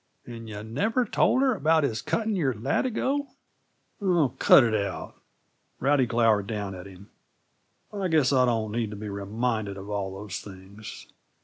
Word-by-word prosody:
"And 115 -2 -9
yuh 105 0 -7
never 200 - 0
told 260 - +2
her 265 -2 +3
about 160 -4 +2
his 115 -6 -1
cutting 220 -1 -1
your 140 -9 0
latigo 260 - -1 0.4
" - - -43
"Oh, 175 -8 +2
cut - - +7
it 115 -2 0
out!" 100 -3 -3 0.7
Rowdy 135 -1 +2
glowered 115 -4 +2
down 100 -3 -4
at 90 +1 -9
him. 95 +1 -14 0.8
"I 200 -2 -1
guess 155 -5 +3
I 130 -1 +4
don't 110 -3 0
need 115 -1 -1
to 105 - -7
be 105 +1 -6
reminded 105 +1 -2
of 100 +2 -8
all 100 -2 -2
those 100 0 -6
things. 100 +2 -11
115 Hz, 170 wpm, -26 LUFS, 100-155 Hz, 0.8 s, cut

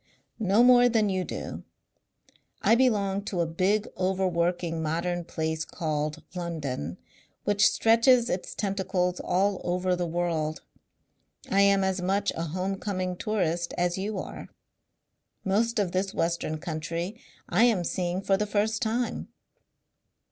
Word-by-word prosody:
"No 210 +2 +4
more 245 0 +7
than 220 -3 +2
you 185 -1 0
do. - - -6 1.0
I - - +5
belong 205 -6 +2
to 185 - -3
a - - +2
big 190 +6 +1
overworking 175 -3 0
modern 170 +3 -1
place 160 -1 -2
called 155 -1 -3
London 145 - -4 0.5
which 205 -1 +4
stretches 230 +2 +4
its 180 -6 -3
tentacles 190 -3 -1
all 195 +1 +1
over 180 +1 0
the 175 -1 -2
world. 165 -2 -1 0.9
I 195 - +4
am 200 -1 +4
as 190 -1 0
much 195 +3 +1
a 165 - -3
home 185 +4 -3
coming 185 -3 -2
tourist 175 -5 -1
as 175 +1 0
you 205 +1 -3
are. - - -6 1.0
Most 225 +5 +1
of 200 -4 +1
this 190 +1 -1
western 165 -2 -1
country 165 +7 -4 0.3
I 220 +7 +4
am 220 -7 +2
seeing 180 +2 -2
for 195 0 +3
the 210 +1 -1
first 215 +3 0
time." 235 +1 -1
185 Hz, 135 wpm, -27 LUFS, 170-205 Hz, 1.0 s, more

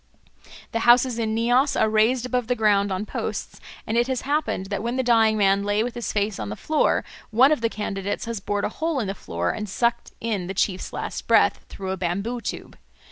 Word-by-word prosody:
The 230 - -1
houses 240 +1 +4
in 220 -1 -1
Nias 245 +5 +2
are - - +4
raised 220 +3 +2
above 250 -2 -1
the 250 - +1
ground 205 -3 +2
on 190 +3 -2
posts, - - -5 0.2
and 225 +2 +1
it 240 - +2
has 260 -2 -1
happened 285 -8 -1
that 200 - -1
when 235 +2 -2
the 260 - 0
dying 225 -3 +4
man 200 -1 +3
lay 205 +1 +1
with 245 0 -3
his 240 -1 -4
face 205 -1 -1
on 105 - -4
the 105 - -4
floor, 310 - +1 0.3
one 250 +6 +5
of 300 - +1
the 230 - +1
candidates 200 -2 -3
has 230 -2 -4
bored 205 +1 -2
a - - -1
hole 315 +4 -2
in 230 - -1
the 195 - -2
floor 85 - -3
and 210 -1 -5
sucked 235 +4 0
in 210 -6 -2
the 190 - -5
chief's 185 -1 -1
last - - -5
breath - - +4
through 190 -1 -5
a 190 - -2
bamboo 200 +7 -2
tube. - - -6
220 Hz, 225 wpm, -24 LUFS, 200-240 Hz, 0.3 s, one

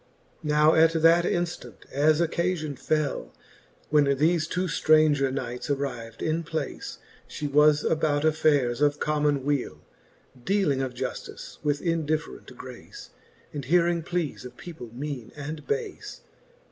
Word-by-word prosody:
Now 150 0 +4
at 160 +1 +5
that 165 +1 +5
inftant, 175 0 -3
as 150 +2 +3
occafion 170 -3 -1
fell, 155 +2 -2 0.6
When 150 -1 +5
thefe 155 +4 +2
two 180 +1 -1
ftranger 155 -4 +3
knights 125 -1 -4
arriv'd 120 -5 -3
in 160 +1 0
place, 160 -3 -5 0.3
She 150 - -6
was 150 +1 +4
about 155 -2 +1
affaires 145 -5 +2
of 145 0 +2
common 150 -2 +1
wele, 145 -3 -1 0.6
Dealing 190 -8 +1
of 130 -2 -3
juftice - - -6
with 145 -1 0
indifferent 155 -5 -2
grace. 125 -2 -11 0.4
And 145 -2 -4
hearing 170 +3 +3
pleas 170 -2 -3
of 125 -1 -11
people, 160 -9 -9
meane 130 -1 -6
and 150 +1 -7
bafe. 435 -2 -4
150 Hz, 130 wpm, -26 LUFS, 140-165 Hz, 0.6 s, at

